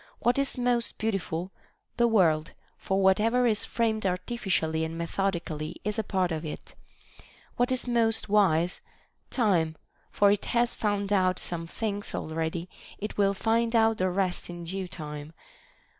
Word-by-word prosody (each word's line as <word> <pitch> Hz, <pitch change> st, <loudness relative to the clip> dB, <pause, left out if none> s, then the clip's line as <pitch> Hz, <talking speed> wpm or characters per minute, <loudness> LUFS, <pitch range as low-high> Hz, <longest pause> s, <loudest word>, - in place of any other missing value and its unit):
What 245 Hz, +3 st, +2 dB
is 275 Hz, -1 st, 0 dB
most 245 Hz, -1 st, +1 dB
beautiful 195 Hz, -4 st, -2 dB, 0.2 s
"? -, -, -46 dB
The 235 Hz, -, +4 dB
world; 165 Hz, -8 st, +3 dB, 0.2 s
for 195 Hz, 0 st, -1 dB
whatever 225 Hz, +6 st, +4 dB
is 220 Hz, -3 st, +2 dB
framed 220 Hz, -2 st, 0 dB
artificially 180 Hz, -4 st, -1 dB
and 160 Hz, +1 st, -4 dB
methodically 170 Hz, -3 st, -2 dB
is 210 Hz, +2 st, -2 dB
a -, -, +1 dB
part 185 Hz, -3 st, 0 dB
of 160 Hz, 0 st, -2 dB
it. 155 Hz, -, -7 dB, 0.8 s
What 245 Hz, +1 st, +2 dB
is 255 Hz, -1 st, -1 dB
most 230 Hz, -2 st, +2 dB
wise 180 Hz, -5 st, +3 dB, 0.3 s
\ -, -, -45 dB, 0.2 s
Time; 165 Hz, -6 st, +2 dB, 0.3 s
for 200 Hz, -1 st, +4 dB
it 205 Hz, -, 0 dB
has 240 Hz, 0 st, +1 dB
found 205 Hz, -1 st, -1 dB
out 185 Hz, -2 st, +3 dB
some 165 Hz, -1 st, -4 dB
things 205 Hz, +2 st, -3 dB
already, 160 Hz, +2 st, -3 dB, 0.3 s
it 210 Hz, 0 st, -6 dB
will 200 Hz, -1 st, +3 dB
find 230 Hz, +3 st, +1 dB
out 225 Hz, -1 st, +4 dB
the 185 Hz, 0 st, +2 dB
rest 185 Hz, -1 st, -1 dB
in 175 Hz, 0 st, -7 dB
due 185 Hz, +2 st, -3 dB
time. 150 Hz, -2 st, -7 dB
195 Hz, 160 wpm, -28 LUFS, 170-225 Hz, 0.8 s, The